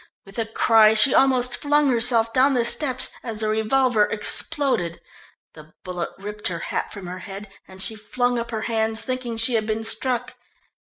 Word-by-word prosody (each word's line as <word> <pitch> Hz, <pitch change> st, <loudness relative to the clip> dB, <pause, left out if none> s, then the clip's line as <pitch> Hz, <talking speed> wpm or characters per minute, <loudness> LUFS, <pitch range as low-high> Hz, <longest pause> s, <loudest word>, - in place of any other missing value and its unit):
With 195 Hz, +3 st, -9 dB
a 225 Hz, -, -2 dB
cry 220 Hz, -1 st, +4 dB
she 235 Hz, +4 st, +7 dB
almost 250 Hz, -2 st, +3 dB
flung 290 Hz, -1 st, +2 dB
herself 230 Hz, -1 st, +2 dB
down 265 Hz, +1 st, +3 dB
the 240 Hz, -2 st, +1 dB
steps 260 Hz, +1 st, 0 dB
as 225 Hz, -3 st, -7 dB
the 215 Hz, -, -1 dB
revolver 220 Hz, +1 st, +2 dB
exploded. 215 Hz, -, -1 dB, 0.5 s
The 155 Hz, 0 st, -16 dB
bullet 180 Hz, -2 st, -5 dB
ripped 210 Hz, +2 st, -4 dB
her 170 Hz, -, -3 dB, 0.2 s
hat -, -, -2 dB
from 200 Hz, -3 st, -8 dB
her 180 Hz, +1 st, -7 dB
head, 195 Hz, +2 st, -9 dB, 0.2 s
and 190 Hz, 0 st, -6 dB
she 220 Hz, -, -1 dB
flung 245 Hz, +3 st, -2 dB
up 235 Hz, 0 st, -5 dB
her 220 Hz, -2 st, -4 dB
hands, 225 Hz, -1 st, -1 dB
thinking 255 Hz, -3 st, -4 dB
she 230 Hz, +2 st, +3 dB
had 220 Hz, -2 st, 0 dB
been 220 Hz, 0 st, -2 dB
struck. 240 Hz, +2 st, -1 dB
225 Hz, 180 wpm, -22 LUFS, 210-250 Hz, 0.5 s, she